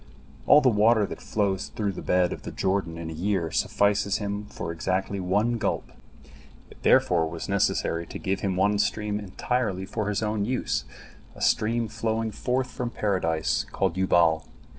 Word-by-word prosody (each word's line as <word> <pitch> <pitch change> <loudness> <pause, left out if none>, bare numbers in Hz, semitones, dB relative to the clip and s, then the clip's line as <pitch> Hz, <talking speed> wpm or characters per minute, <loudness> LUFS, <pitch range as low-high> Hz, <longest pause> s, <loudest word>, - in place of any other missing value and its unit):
All 150 - +8
the - - -5
water 110 0 +4
that - - -8
flows 100 -3 -1
through 105 -2 -2
the 95 - -7
bed 90 -1 +2
of - - -8
the - - -7
Jordan 95 -4 -1
in 80 -1 -5
a - - -5
year 85 -1 -1
suffices 100 0 +1
him 105 0 -4
exactly 95 +4 -2
for - - -4
one 105 +6 +1
gulp. 105 - -2 0.8
It - - -16
therefore 85 -2 +4
was 85 0 -6
necessary 95 -3 0
to - - -7
give 95 +1 -2
him 95 -2 -1
one 100 +2 +2
stream 105 0 0
entirely 100 -1 -2
for 105 +1 -3
his 105 +1 -1
own 105 -1 0
use, 125 +4 -1 0.5
a - - -12
stream 115 +1 +2
flowing 110 +1 -2
forth 125 +4 -1
from 125 -1 -3
Paradise, 90 -8 0
called 95 -3 0
Yubal. 85 -4 +3
100 Hz, 170 wpm, -26 LUFS, 90-110 Hz, 0.8 s, All